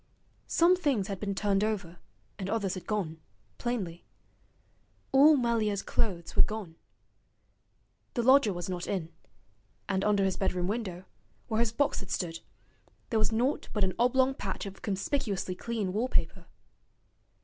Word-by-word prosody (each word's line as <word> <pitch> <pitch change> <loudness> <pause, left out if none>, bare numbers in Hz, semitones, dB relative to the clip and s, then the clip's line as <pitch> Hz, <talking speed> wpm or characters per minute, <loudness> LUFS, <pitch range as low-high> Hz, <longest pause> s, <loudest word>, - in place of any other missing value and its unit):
Some 345 +2 +5
things 275 - 0
had 195 -2 -3
been 200 -2 -2
turned 200 0 +1
over 195 -6 -2 0.4
and 190 -1 -3
others 200 -4 0
had 185 -2 -7
gone, 170 -7 -2 0.4
plainly. 195 -9 -3 1.1
All 290 +3 +7
Melier's 225 -5 +1
clothes 180 -7 -2
were - - +6
gone. 210 -7 -1 1.4
The 240 - +1
lodger 260 -3 +6
was 175 -2 -4
not 180 -2 -4
in, 170 -4 -3 0.7
and 195 -1 0
under 205 -1 +3
his 190 - 0
bedroom 185 -2 0
window, 190 -3 -3 0.4
where 220 -1 0
his 230 -2 +2
box 280 +5 +1
had 190 - -9
stood, 165 -2 -2 0.7
there 225 - +2
was 215 - +2
naught 245 +6 0
but 210 - +1
an 185 -1 +1
oblong 260 +2 +4
patch 195 -7 -4
of 195 -1 -8
conspicuously 200 -1 -1
clean 210 -1 -3
wallpaper. 235 +5 -1
205 Hz, 145 wpm, -30 LUFS, 185-235 Hz, 1.4 s, All